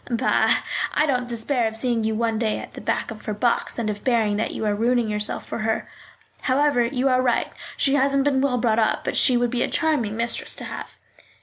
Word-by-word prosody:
"Bah! 240 Hz, +1 st, +2 dB, 0.3 s
I 300 Hz, -, +3 dB
don't 250 Hz, -4 st, -1 dB
despair 235 Hz, +1 st, 0 dB
of 220 Hz, 0 st, -2 dB
seeing 235 Hz, -1 st, 0 dB
you 220 Hz, 0 st, 0 dB
one 225 Hz, -1 st, 0 dB
day 220 Hz, -2 st, 0 dB
at -, -, -9 dB
the -, -, -9 dB
back -, -, -2 dB
of 215 Hz, -, -10 dB
her 215 Hz, -, -3 dB
box, 235 Hz, +3 st, 0 dB
and 235 Hz, -2 st, -2 dB
of 210 Hz, -1 st, -3 dB
hearing 225 Hz, -5 st, +2 dB
that 220 Hz, -, -1 dB
you -, -, -4 dB
are 210 Hz, -, +1 dB
ruining 235 Hz, +2 st, +1 dB
yourself 210 Hz, 0 st, -1 dB
for -, -, -5 dB
her. 220 Hz, 0 st, -1 dB, 0.5 s
However, 280 Hz, -1 st, +2 dB
you 250 Hz, +2 st, 0 dB
are 255 Hz, -1 st, +3 dB
right, 245 Hz, -2 st, 0 dB, 0.2 s
she 275 Hz, -, +1 dB
hasn't 275 Hz, 0 st, +2 dB
been 270 Hz, -2 st, +2 dB
well 265 Hz, -2 st, +1 dB
brought 230 Hz, -2 st, +1 dB
up; 220 Hz, -, +1 dB
but -, -, -2 dB
she 255 Hz, -3 st, +5 dB
would 240 Hz, -1 st, 0 dB
be 245 Hz, -1 st, -1 dB
a -, -, +2 dB
charming 245 Hz, -10 st, 0 dB
mistress 235 Hz, 0 st, -1 dB
to -, -, -6 dB
have." -, -, -8 dB
235 Hz, 230 wpm, -23 LUFS, 220-260 Hz, 0.5 s, she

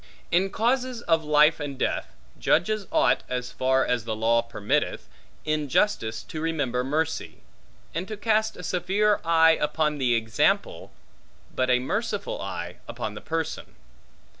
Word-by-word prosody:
In 185 Hz, +3 st, +3 dB
causes 245 Hz, +2 st, 0 dB
of 165 Hz, -1 st, +2 dB
life 150 Hz, +1 st, +4 dB
and 145 Hz, -3 st, -5 dB
death, -, -, -2 dB, 0.2 s
judges 215 Hz, 0 st, +1 dB
ought -, -, +3 dB
(as 125 Hz, -1 st, -3 dB
far 130 Hz, +1 st, +2 dB
as 125 Hz, -2 st, 0 dB
the 110 Hz, -1 st, -3 dB
law 115 Hz, +2 st, +3 dB
permitteth) 105 Hz, -3 st, -2 dB, 0.4 s
in 155 Hz, -2 st, -1 dB
justice 115 Hz, -, +1 dB
to 155 Hz, -, -7 dB
remember 145 Hz, -7 st, -1 dB
mercy; 155 Hz, +4 st, -2 dB, 0.5 s
and 170 Hz, +4 st, -3 dB
to 215 Hz, -, -6 dB
cast 220 Hz, 0 st, +1 dB
a 180 Hz, -, -9 dB
severe 200 Hz, +4 st, +1 dB
eye 165 Hz, -1 st, +5 dB
upon 150 Hz, 0 st, 0 dB
the 125 Hz, -3 st, +2 dB
example, 110 Hz, -2 st, 0 dB, 0.6 s
but 130 Hz, 0 st, 0 dB
a 125 Hz, -, +5 dB
merciful 225 Hz, -, -2 dB
eye -, -, -5 dB
upon -, -, -5 dB
the -, -, -9 dB
person. 160 Hz, 0 st, -4 dB
155 Hz, 145 wpm, -26 LUFS, 130-195 Hz, 0.6 s, eye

